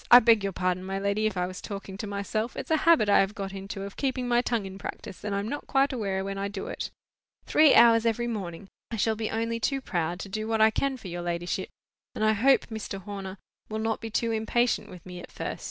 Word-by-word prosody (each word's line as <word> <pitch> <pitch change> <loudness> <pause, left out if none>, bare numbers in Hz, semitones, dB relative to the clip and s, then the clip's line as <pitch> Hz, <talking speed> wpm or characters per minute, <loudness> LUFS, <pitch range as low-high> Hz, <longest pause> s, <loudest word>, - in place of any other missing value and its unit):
I 245 - +12
beg 225 -3 +4
your 195 - 0
pardon, 185 0 -1
my 190 +1 -3
lady, 200 +2 +1
if 205 -3 -3
I 180 - +1
was 185 0 -7
talking 195 -1 -6
to 210 - -4
myself; 205 +3 -3
it's - - -5
a 315 - +5
habit 320 -11 +6
I 205 - +6
have 195 +2 +1
got 195 -2 -5
into 195 0 -6
of 200 0 -7
keeping 260 -2 -1
my 240 0 +3
tongue 235 -4 -1
in 190 0 -8
practice, 190 - -7
and 205 -1 -2
I - - 0
am 200 +1 -2
not 290 +5 -5
quite 275 0 +2
aware 195 -5 -2
when 195 0 -4
I 200 - -1
do 200 -1 -5
it. - - -4 0.6
Three 305 -2 +6
hours 230 -1 +7
every 230 +1 +1
morning! 195 -6 -5 0.2
I 230 - -3
shall 220 +1 +1
be 220 0 -2
only 230 +1 -1
too 270 +4 0
proud 175 -7 -2
to - - -6
do 215 +2 -4
what 225 0 0
I 220 0 +6
can 275 +3 0
for 215 - -10
your 175 0 -4
ladyship; 175 0 -2 0.5
and 215 - 0
I 215 - +5
hope 260 +6 +4
Mr. 220 -2 -4
Horner 195 -1 -6 0.3
will 215 - -3
not 225 0 -1
be 225 - -5
too 230 +1 0
impatient 220 -1 +1
with 180 -2 -12
me 180 -1 -8
at - - -11
first. - - -5
210 Hz, 255 wpm, -27 LUFS, 195-230 Hz, 0.6 s, I